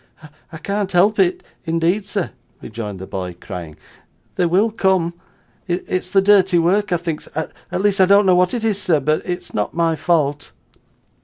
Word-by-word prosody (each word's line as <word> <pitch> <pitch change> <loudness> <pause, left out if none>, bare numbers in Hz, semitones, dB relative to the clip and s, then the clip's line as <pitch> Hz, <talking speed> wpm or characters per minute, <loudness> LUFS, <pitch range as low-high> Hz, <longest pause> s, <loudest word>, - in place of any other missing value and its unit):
'I 160 - -8
can't 200 +3 -3
help 200 +4 +3
it, 185 -1 +2 0.2
indeed, 170 +4 0
sir,' 200 -4 -2 0.3
rejoined 110 -3 -7
the 95 - -8
boy, 90 -2 -5
crying. 85 -6 -8 0.6
'They 175 - +1
will 195 +6 +2
come; 190 -5 +1 0.5
it's 180 +1 -2
the 195 +1 +3
dirty 195 -3 +4
work 185 +4 +2
I 175 - +3
think, 165 -2 -4
sir 160 +1 -5 0.2
at 185 - -1
least 200 -1 +2
I 185 - +6
don't 200 +1 +5
know 185 - +5
what 180 +4 +2
it 235 - -3
is, 210 -3 0
sir, 160 -4 +2
but 155 +3 0
it's 180 -1 -5
not 105 - -2
my 165 -1 +1
fault. 145 -4 0
180 Hz, 180 wpm, -19 LUFS, 160-195 Hz, 0.6 s, I